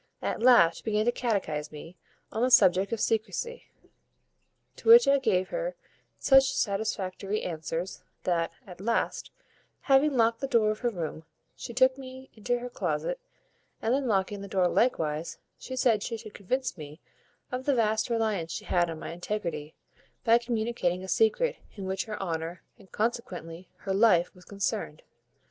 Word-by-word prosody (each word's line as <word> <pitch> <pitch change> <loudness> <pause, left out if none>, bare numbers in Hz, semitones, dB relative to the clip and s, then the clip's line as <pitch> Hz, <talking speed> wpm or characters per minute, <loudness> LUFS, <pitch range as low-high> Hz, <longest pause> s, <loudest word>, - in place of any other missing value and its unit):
At - - -2
last 235 -10 +6
she - - -12
began 215 -1 0
to 240 - +3
catechise 190 -12 -2
me 160 +3 -10 0.4
on 220 - -3
the 250 - +3
subject 195 -6 +5
of 230 - -2
secrecy, 235 - -2 1.1
to - - -2
which 475 +1 +9
I 280 0 +5
gave 190 -8 +1
her - - -3 0.4
such 270 -1 +5
satisfactory 200 -1 -2
answers, 165 +2 -4 0.2
that, 170 -2 0
at 180 -2 -11
last, 230 +3 -1 0.5
having 275 0 +3
locked 230 0 +3
the 275 - -1
door 220 -4 +3
of 215 - -5
her 240 - 0
room, 165 -6 -5 0.3
she - - -7
took 260 +2 +3
me 260 0 -10
into 245 +3 -1
her 245 +1 -6
closet, - - -2 0.6
and 225 - 0
then 270 0 0
locking 200 -1 0
that 200 - -8
door 185 -2 +2
likewise, 160 -8 0 0.2
she 260 - -7
said 235 -5 +2
she 230 +2 -3
should 215 -2 -11
convince 245 +1 -3
me 150 +1 -9 0.5
of 255 +1 -4
the 280 - +2
vast 220 -1 +1
reliance 215 -8 -1
she - - -5
had 175 -1 +1
on 165 - -5
my - - -7
integrity, 170 -4 -4 0.5
by 230 0 +5
communicating 225 -6 -1
a - - -7
secret 225 - +2 0.2
in 195 -3 -6
which 190 0 -2
her 215 -2 -6
honour, 165 -1 -4 0.2
and 190 - -19
consequently 185 -7 -4
her 195 - -4
life, 190 -4 +4
was 180 -1 -18
concerned. 200 -5 -3
215 Hz, 165 wpm, -28 LUFS, 180-240 Hz, 1.1 s, which